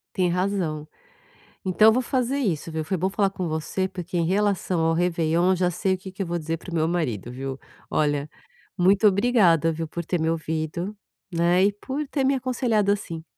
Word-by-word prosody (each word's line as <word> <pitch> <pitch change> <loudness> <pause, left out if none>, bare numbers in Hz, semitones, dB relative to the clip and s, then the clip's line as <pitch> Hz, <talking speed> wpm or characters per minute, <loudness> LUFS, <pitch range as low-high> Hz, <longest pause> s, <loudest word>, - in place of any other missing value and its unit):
Tem 180 -2 +2
razão. 175 -5 -1 0.8
Então 200 +4 +5
eu - - +7
vou 255 +2 +1
fazer 260 +2 0
isso 170 - -1
viu, 160 -1 -3
foi 190 +3 -1
bom 190 +3 0
falar 200 -1 +1
com 185 -3 -4
você 160 +4 -2
porque 180 -1 -6
em 170 - +2
relação 195 -2 +1
ao 165 0 +2
réveillon 170 +1 +2
já 180 0 +2
sei 190 +2 0
o 185 - -5
que 190 0 -9
que 195 - -4
eu 190 - -3
vou 170 0 -2
dizer 160 +1 -3
para 180 - -10
o - - -6
meu 160 -1 +2
marido 125 - -2
viu, 135 +1 -5 0.3
olha, 145 -1 0 0.5
muito 195 +4 +4
obrigada 190 -6 +3
viu 160 0 -4
por 170 +1 -5
ter 175 0 -1
me 160 - +1
ouvido, 160 +4 -3 0.4
né, 175 +2 +4
e 205 - +3
por 270 +8 -4
ter 275 0 -1
me 275 +1 +3
aconselhado 240 -5 +1
assim. 165 -5 -4
180 Hz, 205 wpm, -24 LUFS, 160-200 Hz, 0.8 s, eu